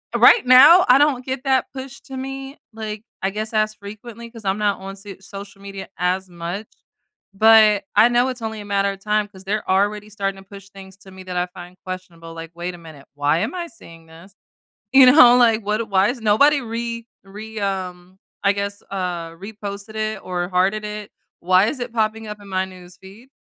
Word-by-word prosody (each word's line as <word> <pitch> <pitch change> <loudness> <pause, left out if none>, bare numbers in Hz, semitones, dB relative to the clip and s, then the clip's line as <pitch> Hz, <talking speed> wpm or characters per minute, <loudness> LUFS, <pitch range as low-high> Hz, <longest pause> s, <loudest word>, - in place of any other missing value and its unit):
right 465 - +6
now, 285 +9 +8
I 250 - +8
don't 280 -4 +2
get 260 -1 -4
that 265 -1 +2
pushed 265 0 -9
to 265 -1 -7
me, 270 +1 -6 0.2
like, 215 -1 -6 0.2
I 195 - +1
guess, 215 +3 -5
as 215 0 +1
frequently 215 +3 -10
'cause 230 -3 -13
I'm 190 +1 0
not 205 -1 0
on 195 +1 -8
se 195 -1 -11
social 195 0 -11
media 195 -1 -8
as 185 +1 -1
much, 175 +5 -6 0.7
but 215 -1 +6
I 235 - +6
know 245 +1 +2
it's 250 -2 -6
only 220 -1 -5
a - - -10
matter 200 0 0
of 195 - -10
time 210 0 +1
'cause 190 -2 -15
they're 210 +2 -2
already 205 +2 +1
starting 195 -2 -4
to - - -33
push 195 -1 -12
things 190 -1 -13
to 195 -1 -16
me 190 0 -12
that 180 -1 -5
I 180 0 0
find 180 0 -12
questionable. 175 -3 -8
Like, 165 0 -9
"Wait 175 +1 -5
a - - -12
minute. 155 -4 -14
Why 145 +2 +1
am 280 - -2
I 345 -1 -4
seeing 165 - -15
this? 170 +4 -16 0.6
You 265 -1 +8
know, 250 -4 +8
like, 230 -3 +3
what 215 +1 -1
why 195 0 +3
is 245 -1 -4
nobody 280 +8 +4
re 230 0 -5 0.2
re 215 +2 -9
um, 185 -2 -4 0.3
I 200 - +4
guess, 200 0 -4
uh, 180 -4 -3
reposted 200 +3 -8
it 215 -1 -2
or 180 -1 -3
hearted 195 +3 +1
it? 210 0 -7 0.3
Why 185 +2 +4
is 265 - -3
it 245 -1 -4
popping 220 -1 -1
up 210 0 -7
in 200 - -13
my 190 0 0
news 180 -1 -14
feed?" 205 +7 -15
205 Hz, 210 wpm, -21 LUFS, 190-225 Hz, 0.7 s, now